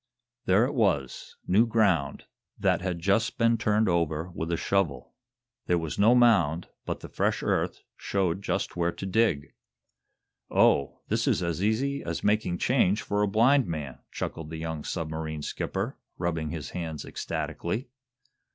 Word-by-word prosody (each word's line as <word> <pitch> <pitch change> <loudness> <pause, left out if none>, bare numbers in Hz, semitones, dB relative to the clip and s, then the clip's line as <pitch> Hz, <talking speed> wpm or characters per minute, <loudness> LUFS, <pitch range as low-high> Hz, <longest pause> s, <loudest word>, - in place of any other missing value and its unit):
There 100 +5 +4
it 135 - -3
was 85 - 0
new 105 +6 +4
ground, 95 -11 +1 0.3
that - - +2
had 90 -2 -2
just 100 +7 +1
been 115 0 +4
turned 110 -1 +2
over 85 -1 0
with 80 0 -4
a 85 - +1
shovel. 85 -11 -1 0.5
There 90 - +3
was 80 -2 -4
no 110 +5 +6
mound, 95 -10 +4 0.2
but - - -3
the - - -7
fresh - - -1
earth - - -1
showed 95 -2 -1
just 95 0 -2
where 85 0 +1
to 95 - -7
dig. 95 -7 +1 1.0
"Oh, 70 - +3
this - - 0
is - - +2
as 85 +2 -2
easy 135 +7 0
as 85 0 -4
making 105 -4 +1
change 105 -3 +2
for 105 0 0
a 105 - +3
blind 120 +6 +4
man!" 75 -6 -5
chuckled 80 -1 -5
the 80 - -6
young 80 -1 -4
submarine 80 -2 -4
skipper, - - -3 0.2
rubbing 85 -3 -2
his 80 -3 -5
hands 80 -4 -5
ecstatically. 110 +10 -3
90 Hz, 155 wpm, -27 LUFS, 80-110 Hz, 1.0 s, no